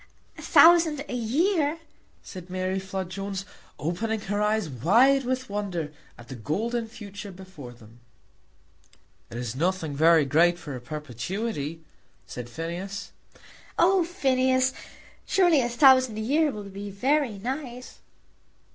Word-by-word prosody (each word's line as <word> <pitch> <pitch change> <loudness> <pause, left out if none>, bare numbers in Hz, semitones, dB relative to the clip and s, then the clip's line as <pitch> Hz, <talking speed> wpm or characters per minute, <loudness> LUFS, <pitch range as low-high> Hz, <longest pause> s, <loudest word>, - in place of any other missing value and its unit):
"A - - -11
thousand 330 -4 +5
a - - -6
year!" 295 - +1 0.5
said 185 -2 -10
Mary 185 +1 -2
Flood 190 -1 -5
Jones, 195 0 -5 0.3
opening 215 +8 -2
her 205 +1 -2
eyes 210 -2 +1
wide 235 - +3
with 255 +1 -2
wonder 190 -7 -4 0.2
at 120 - -14
the 130 - -8
golden 220 - -2
future 205 -2 -9
before 180 -9 -11
them. 115 -1 -17 1.3
"It 120 - -8
is 120 -1 -4
nothing 165 -1 -1
very 160 0 +5
great 170 +5 +3
for 150 -6 -7
a 125 - -7
perpetuity," 155 - -5 0.4
said 120 -1 -8
Phineas. 175 +8 -6 0.7
"Oh, 370 +1 +4
Phineas; 260 -6 +1 0.5
surely 350 -7 +4
a 240 - -1
thousand 255 -2 +5
a - - -3
year 295 +7 +2
will 210 -6 -6
be 200 +1 -8
very 255 +3 0
nice." 250 +2 -6
200 Hz, 130 wpm, -26 LUFS, 165-255 Hz, 1.3 s, thousand